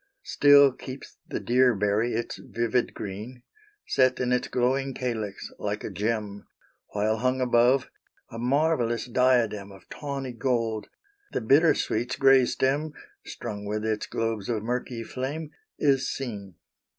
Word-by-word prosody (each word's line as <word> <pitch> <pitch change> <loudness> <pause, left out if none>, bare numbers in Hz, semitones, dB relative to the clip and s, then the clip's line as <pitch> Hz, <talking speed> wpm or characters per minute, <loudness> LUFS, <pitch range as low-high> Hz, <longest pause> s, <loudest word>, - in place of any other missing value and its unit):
Still 145 - +6
keeps 130 +1 -10
the - - -3
deer 125 0 +3
berry 105 +4 +1
its 115 +1 -3
vivid 120 +1 -1
green, 110 +5 -7 0.4
Set 130 -1 +2
in 125 0 0
its 125 - 0
glowing 130 +2 0
calyx 110 -6 -4
like - - -3
a - - -5
gem; 105 -1 -3 0.5
While 110 +1 +1
hung 130 +3 0
above, 125 +1 +3 0.4
a 115 - -7
marvellous 125 -2 +1
diadem 120 -5 +1
Of 95 - -15
tawny 135 -3 -5
gold, 115 -3 -1 0.5
the - - -1
bittersweet's 130 -2 +2
gray 135 -2 +5
stem, 145 +5 0 0.3
Strung 105 -4 -6
with 105 +1 -3
its 110 -1 -1
globes 115 -3 -2
of 110 -3 -1
murky 120 0 -3
flame 145 +6 -5 0.3
is 135 -2 +2
seen. 100 -8 -6
120 Hz, 135 wpm, -26 LUFS, 110-130 Hz, 0.5 s, Still